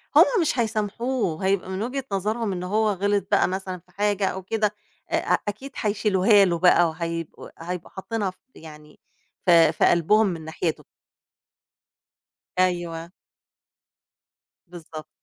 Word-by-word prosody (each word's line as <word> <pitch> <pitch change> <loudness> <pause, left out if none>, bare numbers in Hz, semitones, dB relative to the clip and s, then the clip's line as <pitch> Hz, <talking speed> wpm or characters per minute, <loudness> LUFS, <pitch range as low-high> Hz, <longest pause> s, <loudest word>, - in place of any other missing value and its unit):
هُم - - +10 0.2
مش 300 -5 0
هيسامحوه، 215 -4 -1
هيبقى 190 -1 0
من 190 +1 -3
وجهة 260 +4 -3
نظرهم 210 +3 -1
إن 180 -1 -4
هو 215 +4 +1
غِلط 200 +1 0
بقى - - +4
مثلًا 185 0 -4
في 180 +1 -28
حاجة 205 +1 0
أو 190 0 -4
كده، 210 +1 -1 0.4
أ - - +2
أكيد 215 +7 -5
هيشيلوها 205 -1 +4
له 170 -2 0
بقى، 175 -1 +5
وهيبق 165 0 -5
هيبقوا 175 +1 -6
حاطينها 205 +1 -3
ف 185 - -14 0.2
يعني 150 -1 -14 0.5
في 170 -3 +6
في - - +1
قلبهم 205 +6 +4
من 165 -4 -4
ناحيته. 160 0 -3 1.8
أيوه. 175 -2 -1 1.6
بالضبط. 165 -3 -10
190 Hz, 130 wpm, -24 LUFS, 170-210 Hz, 1.8 s, هُم